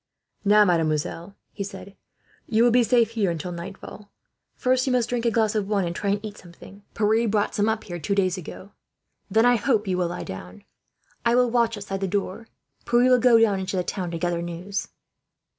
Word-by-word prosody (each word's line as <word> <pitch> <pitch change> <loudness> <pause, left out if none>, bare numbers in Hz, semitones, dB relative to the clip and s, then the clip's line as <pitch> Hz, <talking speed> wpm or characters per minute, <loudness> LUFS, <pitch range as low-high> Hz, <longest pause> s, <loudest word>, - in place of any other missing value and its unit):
"Now, 210 0 +5
mademoiselle," 165 +1 -1 0.2
he 200 - -5
said, 200 0 -9 0.5
"you 225 +1 +3
will 240 - +5
be 245 +1 +5
safe 235 -1 +3
here 215 -5 0
until 170 +1 -4
nightfall. 195 +4 -9 0.4
First 255 +1 +1
you - - +1
must 240 -2 +1
drink 240 -1 -1
a - - +5
glass 220 -2 +1
of 210 -3 -1
wine, 200 -3 0
and 170 0 -4
try 200 - -2
and 205 +2 -1
eat 210 -1 -8
something. 185 +3 -14
Pierre 220 +2 +2
brought 205 -1 0
some 210 +1 +1
up 220 0 -1
here, 175 -2 -7
two 170 +6 -1
days 185 -2 +1
ago. 185 +2 -9 0.6
Then 220 +4 +3
I 245 0 +5
hope 220 -1 +1
you 185 -1 0
will 180 - +1
lie 175 - -5
down. 90 -1 -9 0.6
I 235 0 +3
will 250 -1 +3
watch 230 -2 +1
outside 195 -1 -5
the 195 - 0
door. 200 +3 -3 0.4
Pierre 240 +2 +4
will 250 - +6
go 235 -1 +5
down 210 -4 +3
into 190 0 -3
the 180 - 0
town, 180 0 -4
to 170 - -4
gather 175 0 -1
news." 175 +4 -4
205 Hz, 210 wpm, -24 LUFS, 180-230 Hz, 0.6 s, will